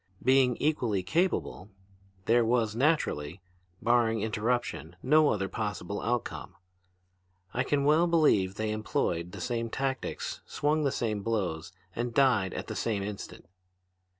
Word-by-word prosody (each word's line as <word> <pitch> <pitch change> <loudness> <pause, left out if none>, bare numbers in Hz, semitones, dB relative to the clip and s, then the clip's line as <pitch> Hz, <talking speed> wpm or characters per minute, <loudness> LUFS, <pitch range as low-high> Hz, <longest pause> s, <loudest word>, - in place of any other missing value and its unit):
Being 130 -1 +4
equally 120 -11 0
capable, 160 - -1 0.6
there 120 +1 +4
was 115 -2 +1
naturally, 115 - 0 0.4
barring 115 -2 +3
interruption, 110 -6 -2
no 150 +3 +5
other 95 -2 0
possible 100 -2 -4
outcome. 120 -1 -3 1.0
I 125 - 0
can 140 +1 0
well 155 +4 +4
believe 125 - +3
they 110 +1 -2
employed 90 -5 -1
the - - -8
same 115 -2 -2
tactics, 135 +2 -3
swung 150 +1 0
the 140 - +2
same 110 -5 -2
blows, 95 -8 -2 0.2
and 120 0 -3
died 120 -9 +3
at - - -4
the - - -6
same 105 -4 -1
instant. 105 0 -7
115 Hz, 130 wpm, -29 LUFS, 100-135 Hz, 1.0 s, no